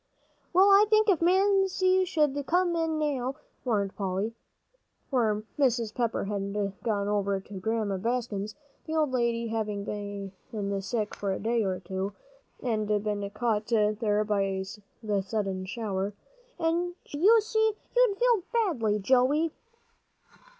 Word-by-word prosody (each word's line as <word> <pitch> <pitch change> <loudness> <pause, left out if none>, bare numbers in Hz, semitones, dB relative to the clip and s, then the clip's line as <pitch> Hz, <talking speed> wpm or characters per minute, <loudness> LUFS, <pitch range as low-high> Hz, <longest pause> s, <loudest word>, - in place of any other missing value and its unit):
"Well, 380 +2 +6
I 400 +2 +7
think 430 0 +4
if 360 -5 +3
Mamsie 375 0 +3
should 300 -5 +1
come 355 0 +2
in 325 -1 0
now," 275 -4 -1 0.3
warned 205 -6 0
Polly, 195 +3 -2 0.8
for 215 -5 +1 0.2
Mrs. 235 -5 +2
Pepper 235 -2 -1
had 200 -1 -3 0.3
gone 205 -4 -1
over 200 -1 0
to 195 0 -9
Grandma 215 -1 -1
Bascom's 215 -1 -2 0.3
the 315 - -2
old 305 -4 +2
lady 235 -2 0
having 210 -2 -2
been 200 0 -5
sick 210 +1 -2
for 200 -1 -2
a 190 - -2
day 230 +1 +1
or 185 -2 -1
two 190 +2 -4 0.5
and 220 -4 0
been 205 -1 -1
caught 215 -1 -1
there 215 -1 +2
by 195 -2 0 0.4
the 205 -2 0
sudden 195 -2 -2
shower, 200 -1 -3 0.4
"and 345 +2 0
should 290 - -7 0.2
see 440 0 -1
you, 435 - 0 0.2
you'd 485 -5 +4
feel 480 -6 +3
badly, 310 - +1
Joey." 260 +9 +3
225 Hz, 135 wpm, -28 LUFS, 200-310 Hz, 0.8 s, I